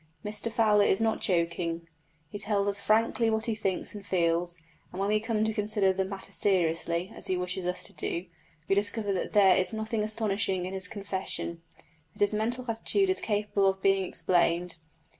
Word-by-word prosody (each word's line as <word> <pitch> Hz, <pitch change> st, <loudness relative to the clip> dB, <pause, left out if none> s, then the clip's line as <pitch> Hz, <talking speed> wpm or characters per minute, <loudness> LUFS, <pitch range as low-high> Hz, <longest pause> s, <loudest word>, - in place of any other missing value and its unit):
Mr 210 Hz, +2 st, -2 dB
Fowler 215 Hz, -3 st, +4 dB
is 190 Hz, -, +2 dB
not 225 Hz, -1 st, 0 dB
joking; 170 Hz, -2 st, -1 dB, 0.4 s
he 205 Hz, -, -6 dB
tells 200 Hz, 0 st, 0 dB
us 200 Hz, 0 st, -1 dB
frankly 225 Hz, +2 st, +2 dB
what 220 Hz, 0 st, 0 dB
he 230 Hz, -, 0 dB
thinks 195 Hz, -4 st, -3 dB
and 205 Hz, -1 st, -8 dB
feels, 170 Hz, -2 st, +1 dB, 0.3 s
and 180 Hz, -, -7 dB
when 200 Hz, +1 st, 0 dB
we 215 Hz, 0 st, +3 dB
come 220 Hz, -1 st, -1 dB
to 220 Hz, -, -1 dB
consider 210 Hz, -2 st, +2 dB
the 190 Hz, -, 0 dB
matter 190 Hz, 0 st, -7 dB
seriously, 170 Hz, -1 st, +1 dB
as -, -, -5 dB
he 185 Hz, -, 0 dB
wishes 180 Hz, 0 st, -3 dB
us 180 Hz, -, -2 dB
to -, -, -4 dB
do, 170 Hz, +2 st, -3 dB, 0.4 s
we -, -, +2 dB
discover 205 Hz, +1 st, +1 dB
that 185 Hz, -, -3 dB
there 195 Hz, -3 st, +6 dB
is 185 Hz, -, 0 dB
nothing 220 Hz, 0 st, -2 dB
astonishing 205 Hz, -4 st, 0 dB
in 185 Hz, -, -5 dB
his 190 Hz, -1 st, -2 dB
confession 190 Hz, -4 st, -3 dB, 0.5 s
that -, -, -18 dB
his 205 Hz, +1 st, +4 dB
mental 235 Hz, +4 st, -1 dB
attitude 375 Hz, -, +1 dB
is 375 Hz, -, -1 dB
capable 205 Hz, -2 st, 0 dB
of 190 Hz, 0 st, -1 dB
being 195 Hz, -1 st, +3 dB
explained. 175 Hz, 0 st, +1 dB
200 Hz, 190 wpm, -28 LUFS, 180-215 Hz, 0.5 s, there